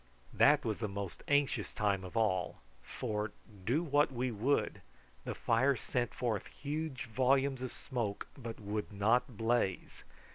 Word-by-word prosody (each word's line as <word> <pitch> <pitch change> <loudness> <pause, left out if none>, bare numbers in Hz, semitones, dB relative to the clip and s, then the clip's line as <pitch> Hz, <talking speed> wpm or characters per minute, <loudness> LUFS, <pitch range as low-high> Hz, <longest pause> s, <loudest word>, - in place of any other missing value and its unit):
That 150 0 +5
was 110 -2 -1
the 110 - -1
most 100 -2 -5
anxious 140 -6 +2
time 100 -3 +1
of 95 +5 -6
all, 95 -5 +1 0.2
for, 105 - -3 0.3
do 145 +9 +3
what 145 -3 +3
we 125 0 -1
would, 120 +7 0 0.4
the - - -3
fire 130 +4 +3
sent 120 -1 -1
forth 115 -6 -2
huge 150 -2 -4
volumes 130 +3 +2
of 130 - -3
smoke, 115 -7 -3
but 115 -4 -7
would 105 0 -3
not 110 +4 +2
blaze. 115 -4 0
120 Hz, 145 wpm, -34 LUFS, 105-135 Hz, 0.4 s, That